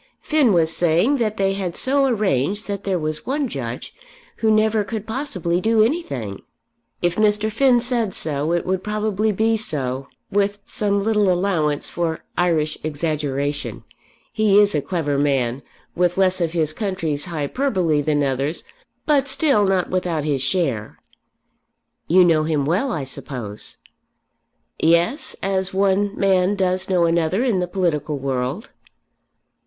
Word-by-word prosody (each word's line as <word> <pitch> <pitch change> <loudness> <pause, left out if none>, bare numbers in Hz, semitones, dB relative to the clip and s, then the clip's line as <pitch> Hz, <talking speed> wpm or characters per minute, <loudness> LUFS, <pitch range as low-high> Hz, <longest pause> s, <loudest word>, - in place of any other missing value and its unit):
Finn 300 -7 +2
was 165 -3 +3
saying 175 - +2
that 220 -3 -1
they 195 0 +1
had 190 -3 -3
so 275 +1 +3
arranged 205 - 0
that 200 -1 -4
there 190 -2 +1
was 155 -1 -3
one 280 +1 0
Judge 125 - -6 0.4
who 220 - +1
never 215 0 +3
could 215 +1 -5
possibly 195 - -2
do 220 0 +4
anything." 140 - -2 0.6
"If 175 0 +1
Mr. 215 0 +2
Finn 245 +2 +4
said 235 -5 -1
so 150 0 -2
it 175 -1 0
would 185 0 -1
probably 215 0 0
be 220 +3 +1
so, 135 - -3 0.2
with 205 0 +1
some 200 -3 0
little 210 -3 +2
allowance 175 -6 0
for 165 -2 -3
Irish 165 -4 0
exaggeration. 145 -2 -3 0.5
He 215 -2 +3
is 205 -1 +4
a 150 - +1
clever 145 -4 -1
man, 135 -3 0 0.3
with 175 0 +1
less 185 -1 +2
of 165 -1 0
his 155 -3 0
country's 165 -7 -2
hyperbole 170 - 0
than 145 0 +1
others; 140 +4 -1 0.4
but 285 -3 +2
still 270 - +2
not 190 -2 0
without 180 -4 -1
his 145 -3 -1
share." 135 - -1 1.1
"You 180 +2 +6
know 165 -3 +4
him 155 -3 0
well, 190 - 0
I 155 -9 -2
suppose." 125 -5 -6 1.0
"Yes; 170 - +2
as 190 -1 -1
one 200 +1 +1
man 190 0 +2
does 185 -1 0
know 180 -2 +3
another 170 +6 +1
in 230 -8 +1
the 180 - -1
political 170 -5 -1
world." 135 - -3
180 Hz, 145 wpm, -21 LUFS, 155-210 Hz, 1.1 s, You